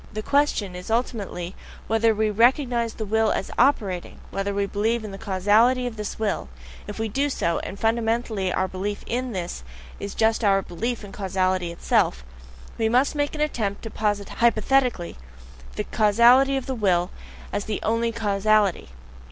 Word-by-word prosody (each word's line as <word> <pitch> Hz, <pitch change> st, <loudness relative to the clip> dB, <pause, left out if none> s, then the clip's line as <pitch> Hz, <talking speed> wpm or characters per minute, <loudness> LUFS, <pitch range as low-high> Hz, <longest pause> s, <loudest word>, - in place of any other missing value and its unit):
The 215 Hz, -1 st, -5 dB
question 280 Hz, -10 st, +1 dB
is 180 Hz, +3 st, -8 dB
ultimately 205 Hz, -6 st, -2 dB, 0.3 s
whether 225 Hz, 0 st, +3 dB
we 220 Hz, +1 st, +1 dB
really 215 Hz, -, +1 dB
recognize 240 Hz, -2 st, +3 dB
the 220 Hz, -, -4 dB
will 220 Hz, +1 st, +2 dB
as -, -, -2 dB
OPERATING, 205 Hz, -9 st, +1 dB
whether 195 Hz, +1 st, -2 dB
we 200 Hz, 0 st, 0 dB
believe 220 Hz, +4 st, -1 dB
in 210 Hz, -, -6 dB
the 195 Hz, -, -8 dB
causality 210 Hz, +7 st, +3 dB
of 245 Hz, -2 st, -4 dB
the 210 Hz, -1 st, -5 dB
will; 205 Hz, -, -2 dB, 0.4 s
if 205 Hz, -, -7 dB
we 225 Hz, 0 st, -1 dB
do 275 Hz, +7 st, 0 dB
so 170 Hz, -10 st, 0 dB
and 200 Hz, -, -7 dB
fundamentally 225 Hz, -3 st, 0 dB
our 185 Hz, -, 0 dB
belief 195 Hz, +2 st, -4 dB
IN 250 Hz, +1 st, -2 dB
THIS 175 Hz, -, -5 dB, 0.4 s
is 200 Hz, -, -6 dB
just 225 Hz, +1 st, +2 dB
our 195 Hz, -2 st, +3 dB
belief 230 Hz, +7 st, -4 dB
in 200 Hz, -, -9 dB
causality 185 Hz, -3 st, -1 dB
itself 65 Hz, -, +1 dB, 0.6 s
we 220 Hz, -1 st, +2 dB
MUST 255 Hz, +4 st, +3 dB
make 290 Hz, -1 st, -1 dB
the 300 Hz, -1 st, 0 dB
attempt 215 Hz, -9 st, -2 dB
to 225 Hz, -, -6 dB
posit 205 Hz, -2 st, -1 dB
hypothetically 235 Hz, -4 st, +2 dB, 0.6 s
the -, -, -2 dB
causality 240 Hz, +6 st, +4 dB
of 265 Hz, -, -4 dB
the 265 Hz, -, -3 dB
will 185 Hz, -6 st, +1 dB, 0.4 s
as 205 Hz, -, -2 dB
the 215 Hz, -, -3 dB
only 230 Hz, +1 st, +1 dB
causality. 210 Hz, -, +1 dB
215 Hz, 170 wpm, -24 LUFS, 195-235 Hz, 0.6 s, causality